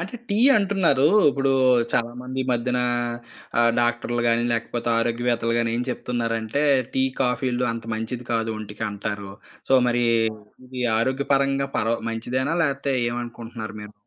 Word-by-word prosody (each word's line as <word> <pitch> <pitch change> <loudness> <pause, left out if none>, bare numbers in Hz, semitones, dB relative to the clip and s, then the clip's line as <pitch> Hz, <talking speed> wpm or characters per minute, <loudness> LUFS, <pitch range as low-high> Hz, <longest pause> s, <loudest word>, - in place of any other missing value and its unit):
అంటే, 195 +8 -6
టీ 205 - 0 0.2
అంటున్నారు. 190 -9 +2 0.2
ఇప్పుడు 135 -1 +1 0.4
చాలామంది 125 +2 -2
ఈ - - -6
మధ్యన 125 +1 0 0.8
ఆహ్, 115 0 +5
డాక్టర్లు 120 0 0
గాని, 115 0 +2
లేకపోతే 115 0 -2
ఆరోగ్యవేత్తలు 115 0 0
గాని 115 -1 0
ఏం 120 - -1
చెప్తున్నారంటే 115 +2 -2 0.3
టీ, 130 - +2 0.2
కాఫీలు 125 -1 0
అంత 115 -1 -7
మంచిది 115 +2 -5
కాదు 115 -1 0
ఒంటికంటారు. 105 -1 -5 0.4
సో, - - +6
మరి 120 0 +1 0.6
ఇది 125 0 -5 0.2
ఆరోగ్యపరంగా 135 +2 +1
పర 115 - 0 0.2
మంచిదేనా 130 +7 -2
లేపోతే 140 -1 -1 0.2
ఏమనుకుంటున్నారు 115 -2 -6
మీరు? 105 0 -10
120 Hz, 130 wpm, -23 LUFS, 115-130 Hz, 0.8 s, సో